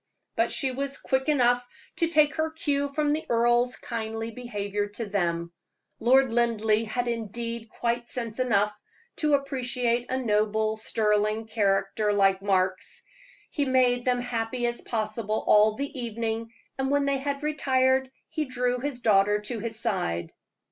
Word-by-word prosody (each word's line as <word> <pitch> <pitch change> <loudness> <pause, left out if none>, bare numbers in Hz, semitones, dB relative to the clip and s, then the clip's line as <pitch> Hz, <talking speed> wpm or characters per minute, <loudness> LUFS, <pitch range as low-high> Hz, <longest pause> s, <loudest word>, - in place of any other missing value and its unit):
But - - +2
she 265 -2 0
was 275 +2 -2
quick 265 +2 -1
enough 245 -4 +3 0.3
to 335 - +2
take 305 -3 +4
her 315 0 +1
cue 285 -3 -1
from 295 0 +1
the 310 - -1
earl's 240 +1 +3
kindly 225 -1 -4
behavior 205 -4 -3
to 205 +3 -5
them. 170 -4 -1 0.5
Lord 260 +2 +4
Linleigh 225 -2 +2
had 245 +3 -2
indeed 230 0 -4
quite 235 +1 -2
sense 230 -2 -4
enough 210 -4 +2 0.4
to 300 -2 +3
appreciate 250 -3 -1
a 260 - 0
noble, 215 -2 +1
sterling 215 0 0
character 210 -1 +1
like 195 -1 +3
Mark's. 185 -2 0 0.5
He 290 - 0
made 250 -2 +3
them 245 -1 +1
happy 240 0 -2
as 240 0 -1
possible 215 -1 -2
all 215 +1 +5
the 280 0 -4
evening, 230 -1 -3 0.3
and 265 0 0
when 285 0 +2
they 275 -1 +1
had 280 +1 -3
retired 265 -3 +2 0.2
he 310 - -2
drew 250 -1 -1
his 265 -1 -4
daughter 205 -2 +4
to 225 +2 -4
his 225 0 -3
side. 180 - -1
235 Hz, 150 wpm, -27 LUFS, 215-260 Hz, 0.5 s, all